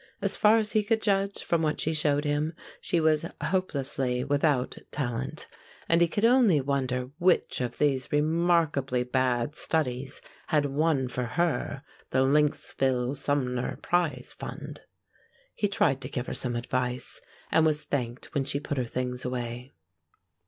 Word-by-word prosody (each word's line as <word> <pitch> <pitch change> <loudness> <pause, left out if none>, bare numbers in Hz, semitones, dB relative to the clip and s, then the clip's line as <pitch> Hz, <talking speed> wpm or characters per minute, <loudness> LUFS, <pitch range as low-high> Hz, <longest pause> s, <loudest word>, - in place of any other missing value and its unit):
As - - 0
far 215 +1 +5
as 215 -1 0
he 215 - +3
could 220 +2 +1
judge 200 -2 0
from 170 -1 +1
what 150 -2 0
she 160 - 0
showed 150 -1 +2
him, 150 +2 0 0.3
she 170 - +1
was 155 -1 +3 0.2
hopelessly 135 -8 0
without 140 -2 +1
talent, 130 +2 -3 0.4
and 170 +1 +3
he 170 - +6
could 205 +6 0
only 235 - +5
wonder 130 -2 -1
which 180 -6 +2
of 125 -1 -3
these 135 -3 +1
remarkably 150 -4 +2
bad 125 +1 0
studies 135 -4 0 0.3
had 150 -3 +2
won 145 -1 +1
for 125 0 -3
her 145 +1 -1 0.3
the 130 0 +2
Lynxville 135 -2 +1
Sumner 130 -3 -1
Prize 155 -8 0
Fund. - - -8 0.7
He 205 - 0
tried 140 -9 +1
to - - -5
give 125 -1 -3
her - - -4
some 120 -2 -1
advice, 125 +1 -2 0.3
and 160 - +4
was 155 -1 +2
thanked 125 -4 -4
when 140 - +1
she 140 - -2
put 145 -1 -3
her 125 - 0
things 125 +1 -3
away. 125 0 -4
145 Hz, 150 wpm, -28 LUFS, 125-160 Hz, 0.7 s, he